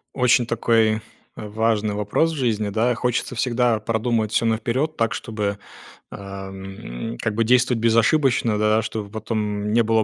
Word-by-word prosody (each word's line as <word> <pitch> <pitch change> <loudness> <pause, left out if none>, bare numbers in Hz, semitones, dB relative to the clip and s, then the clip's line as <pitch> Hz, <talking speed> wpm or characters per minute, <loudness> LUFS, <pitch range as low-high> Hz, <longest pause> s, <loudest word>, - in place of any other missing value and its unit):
Очень 125 -2 +3
такой 110 -2 +2 0.3
важный 110 0 -1
вопрос 105 +11 +1
в - - -5
жизни, 110 -6 0
да. 115 +4 +1
Хочется 125 +1 -1
всегда 120 -2 +1
продумать 110 -1 0
всё 115 - +1
наперед 120 +7 0
так, 115 +1 0
чтобы, 105 -3 -3 0.5
а, 100 -1 -8
м, 95 - -7
как 110 -2 -1
бы 115 - +2
действовать 125 0 +3
безошибочно, 115 0 +3
да, 105 +1 +3
чтобы 110 -2 -5
потом 105 -1 -2
не 115 +1 +4
было 110 0 +2
110 Hz, 150 wpm, -22 LUFS, 105-120 Hz, 0.5 s, не